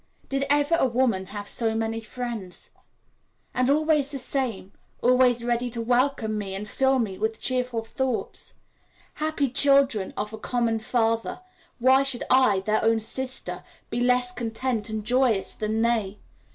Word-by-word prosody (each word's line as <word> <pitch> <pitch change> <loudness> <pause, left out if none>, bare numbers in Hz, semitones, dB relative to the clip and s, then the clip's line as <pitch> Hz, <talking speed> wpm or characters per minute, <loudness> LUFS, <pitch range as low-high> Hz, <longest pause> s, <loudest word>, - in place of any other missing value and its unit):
Did 275 0 0
ever 290 +2 +2
a - - +3
woman 230 -6 0
have 205 +1 -7
so 225 -2 +2
many 225 0 -2
friends? 225 -5 -7 0.8
And 255 +1 +1
always 300 -1 +2
the 285 - -2
same, 250 -7 -3 0.3
always 250 -1 +4
ready 240 0 0
to 235 0 -2
welcome 245 -3 +1
me 195 -2 -5
and 205 +2 -6
fill 265 +3 +2
me 205 -6 -2
with 220 +1 -1
cheerful 250 -3 -1
thoughts. 255 +1 -3 0.6
Happy 305 -2 -1
children 270 -5 +3
of 210 +1 -4
a 220 - -7
common 230 -1 0
Father, 225 0 -1 0.4
why 260 +2 +5
should 270 -3 +1
I, 255 -7 +4
their 215 +2 0
own 225 0 +3
sister, 260 +4 -3 0.3
be 235 - -1
less 250 0 +3
content 230 -1 -3
and 215 -1 -4
joyous 245 -4 +2
than 220 +1 -1
they? 220 -4 0
240 Hz, 150 wpm, -25 LUFS, 220-260 Hz, 0.8 s, why